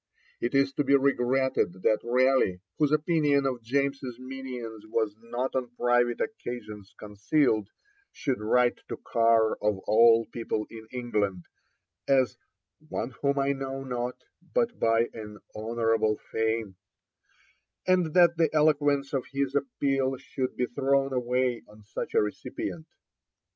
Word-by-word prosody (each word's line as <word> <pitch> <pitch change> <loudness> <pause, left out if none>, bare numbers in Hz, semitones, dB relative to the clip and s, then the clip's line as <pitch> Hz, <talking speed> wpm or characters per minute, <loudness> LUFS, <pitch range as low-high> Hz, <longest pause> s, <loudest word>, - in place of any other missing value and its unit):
It 120 +3 -2
is 135 0 +3
to 145 - 0
be 140 0 +4
regretted 130 -6 +2
that 110 - +3
Raleigh, 125 -6 +2 0.2
whose 150 -2 +3
opinion 150 -3 +2
of 130 -3 -1
James's 135 0 -1
minions 130 -4 -7
was 110 -1 -1
not 120 +3 -3
on 125 -2 -3
private 120 -1 +2
occasions 105 - -6
concealed, 105 +1 0 0.4
should 130 -5 -2
write 120 +3 +2
to - - -5
Carr 115 -1 +2
of 105 -1 +1
all 115 +1 +5
people 115 -2 -3
in 110 -1 -10
England 105 -7 -2 0.6
as 130 -2 +3 0.5
'one 120 -2 -3
whom 140 0 +1
I 140 0 +2
know 135 0 -5
not, 125 -1 -3 0.4
but 235 -1 +1
by 115 +1 +3
an 105 -2 -8 0.2
honourable 110 -1 +1
fame;' 110 -3 -1 1.1
and 180 -3 +2
that 170 -2 +6
the 165 -2 +3
eloquence 145 -2 +2
of 135 -2 -1
his 140 -1 -1
appeal 135 - 0
should 130 0 -4
be 125 - +1
thrown 135 +1 +1
away 125 -1 0
on 105 0 -17
such 105 - -6
a - - +5
recipient. 130 +9 -5
125 Hz, 135 wpm, -28 LUFS, 115-140 Hz, 1.1 s, that